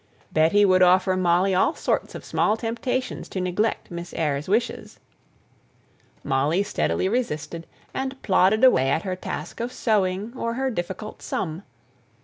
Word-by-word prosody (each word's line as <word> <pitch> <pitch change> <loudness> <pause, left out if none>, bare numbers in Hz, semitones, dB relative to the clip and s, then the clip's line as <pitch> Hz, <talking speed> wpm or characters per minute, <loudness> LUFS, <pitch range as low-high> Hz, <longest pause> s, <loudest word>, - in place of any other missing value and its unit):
Betty 165 +7 +4
would 185 -1 +4
offer 185 +1 +4
Molly 185 +1 +2
all 185 - +2
sorts - - -1
of - - -8
small 215 - +1
temptations 235 +3 -3
to 190 - -4
neglect 185 +4 -1
Miss 170 0 -7
Eyre's 145 -2 -1
wishes; 230 +4 -1 1.2
Molly 145 +7 +1
steadily 85 - 0
resisted, 170 -7 -3 0.3
and 265 0 -3
plodded 195 +4 +3
away 135 - +5
at 160 - +1
her 185 -2 -2
task 170 -3 -6
of 235 +2 -3
sewing 205 -2 0
or 230 -2 -2
her 265 +1 -1
difficult 190 +2 -5
sum. 165 0 -3
185 Hz, 140 wpm, -24 LUFS, 170-225 Hz, 1.2 s, away